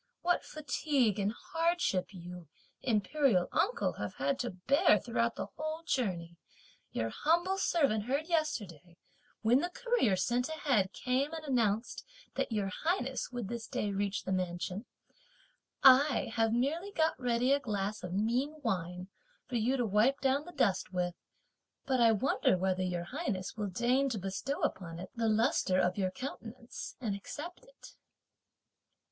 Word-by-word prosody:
What 355 0 +2
fatigue 280 -7 0
and 200 +1 +1
hardship 330 - 0
you, 175 -2 -9 0.3
Imperial 220 - +2
uncle, 455 +7 +1
have - - -4
had 275 - 0
to 245 - -1
bear 210 +5 +3
throughout 235 +2 -1
the - - -3
whole 310 +2 -4
journey, 180 - -2 0.5
your 115 0 -1
humble 345 - +1
servant 245 - +2
heard 280 +5 0
yesterday, 205 - -2 0.5
when 235 +4 +5
the 350 +4 -1
courier 470 - +1
sent 245 +8 0
ahead 270 -11 +1
came 260 +6 0
and 320 -1 -5
announced 230 -4 0 0.3
that - - -2
Your 205 -3 0
Highness 270 -8 -1
would 245 -5 -4
this 235 +1 -5
day 205 - -2
reach 200 0 -1
this 190 - -2
mansion. 180 +3 -2 1.0
I 265 -2 +6
have 225 -1 +2
merely 300 - 0
got 320 -4 +2
ready 245 +1 +2
a 285 - +3
glass 210 -5 -2
of 180 - -6
mean 240 +10 0
wine 180 -4 -2 0.4
for 250 - -6
you 245 +4 +1
to 245 - +1
wipe 220 +7 +3
down 275 +2 +1
the 350 - -9
dust 225 - +1
with, 180 -1 -1 0.7
but 260 -2 +1
I 230 -1 +7
wonder, 235 -2 +2
whether 185 0 0
Your 180 -2 -1
Highness 195 - -3
will 210 -2 -2
deign 245 +8 +2
to 235 - -2
bestow 195 +9 -3
upon 165 -3 -2
it 180 +2 -8
the 230 -1 0
lustre 215 -4 +2
of 180 0 +2
your 190 -1 +1
countenance, 235 +2 -7
and 220 -6 -2
accept 340 - -8
it." - - -15
235 Hz, 155 wpm, -32 LUFS, 195-280 Hz, 1.0 s, I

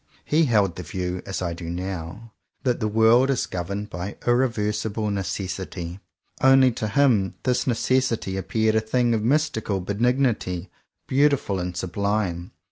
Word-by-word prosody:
He 160 +2 +3
held 105 - +2
the - - -4
view, 90 +1 -4
as 95 -1 -3
I 85 -1 -2
do 85 -1 -7
now, 90 +4 -6 0.3
that 125 -2 +1
the 110 - 0
world 115 +5 +4
is 135 - +1
governed 100 +4 -4
by 90 +3 -5
irreversible 110 -3 0
Necessity 95 -2 -4 0.2
— - - -29
only 135 -1 +6
to 110 -2 -3
him 110 -7 +2
this 125 0 0
Necessity 120 -4 +1
appeared 110 +3 0
a 110 - +3
thing 120 +2 +1
of 110 - +1
mystical 115 -6 0
benignity, 105 -3 0 0.4
beautiful 140 -8 +2
and 90 0 -4
sublime. 95 -1 -1
105 Hz, 145 wpm, -24 LUFS, 95-120 Hz, 0.4 s, only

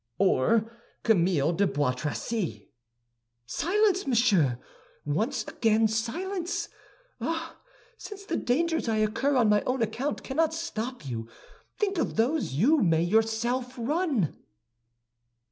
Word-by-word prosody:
"Or 215 - +2 0.3
Camille 175 -7 +3
de 200 +4 +2
Bois 145 -5 +1
Tracy." 170 - -4 0.7
"Silence, 380 - +1
monsieur! 205 - +3 0.5
Once 215 - -1
again, 225 0 +2
silence! 335 - -2 0.5
Ah, 330 0 -4 0.4
since 400 -1 -9
the - - -2
dangers 320 +1 0
I 220 - +1
incur 220 +6 +1
on 240 -4 +4
my 210 0 +4
own 255 -2 +1
account 245 +7 -3
cannot 320 +4 0
stop 255 - -4
you, 115 -3 -5 0.5
think 395 -4 0
of - - -1
those 240 - +1
you 270 - +4
may 165 -4 +3
yourself 225 +6 0
run!" 270 - 0
230 Hz, 115 wpm, -27 LUFS, 200-310 Hz, 0.7 s, on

